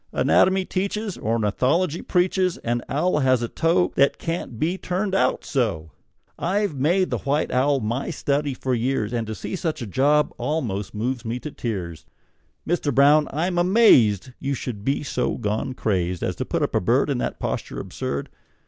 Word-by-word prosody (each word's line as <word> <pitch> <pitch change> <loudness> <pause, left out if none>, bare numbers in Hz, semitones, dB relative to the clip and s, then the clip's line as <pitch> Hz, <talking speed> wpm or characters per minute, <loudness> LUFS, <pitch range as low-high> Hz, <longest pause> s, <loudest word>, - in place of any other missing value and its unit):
Anatomy 190 0 +3
teaches, 200 +2 -2
Ornithology 130 - 0
preaches 185 0 +1
An 120 +1 0
owl 155 +3 +1
has 130 -3 +2
a - - -1
toe 170 +7 +1
That 140 +1 +3
can't 165 -9 -4 0.2
turn 190 +2 -2
out 195 - +1
so! 100 - -1 0.5
I've 200 +1 0
made 170 +8 +1
the - - -1
white 145 +2 0
owl 135 +2 +2
my 115 +5 -2
study 145 -3 -1
for 130 0 -2
years, 120 -2 -1
And 115 -2 -2
to 110 - -4
see - - -5
such 165 -4 -2
a 120 - -4
job 145 +7 +2
almost 110 -11 -2
moves 120 +3 -2
me 115 +1 -3
to 150 - -6
tears! 90 - -5 0.6
Mister 160 -3 0
Brown, 145 +3 +5
I'm 175 +5 0
amazed 135 - +4
You 140 0 -2
should 115 -5 -6
be 135 +4 0
so 125 -3 -1
gone 110 +6 -2
crazed 90 -6 -1
As - - -1
to - - -2
put - - -1
up - - -1
a - - +2
bird - - +2
In - - -1
that - - -2
posture - - -3
absurd! 70 - -4
140 Hz, 175 wpm, -23 LUFS, 115-170 Hz, 0.6 s, Brown